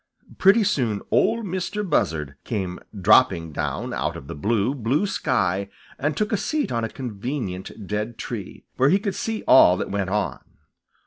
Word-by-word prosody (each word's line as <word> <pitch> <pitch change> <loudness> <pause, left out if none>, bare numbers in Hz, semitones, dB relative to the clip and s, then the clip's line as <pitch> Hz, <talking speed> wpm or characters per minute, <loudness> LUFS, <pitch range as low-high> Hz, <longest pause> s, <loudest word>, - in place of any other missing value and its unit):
Pretty 200 +4 +6
soon 125 - 0
Ol' 230 +1 +2
Mistah 190 +2 -3
Buzzard 80 - 0
came 95 -5 -3 0.2
dropping 95 -5 +4
down - - -3
out - - -2
of - - -10
the - - -7
blue, 105 - 0
blue 135 - 0
sky 100 - 0 0.3
and 145 +2 -1
took 210 - 0
a 215 - +2
seat 305 +7 -1
on 115 -1 -1
a 115 - -2
convenient 110 -5 -5
dead 105 +3 -3
tree, 110 -6 -7
where 135 +2 +4
he 190 - +5
could 200 -1 -2
see 225 -1 -3
all 90 -8 +7
that - - -4
went 100 -2 -1
on. 105 +1 -1
115 Hz, 170 wpm, -23 LUFS, -, 0.3 s, all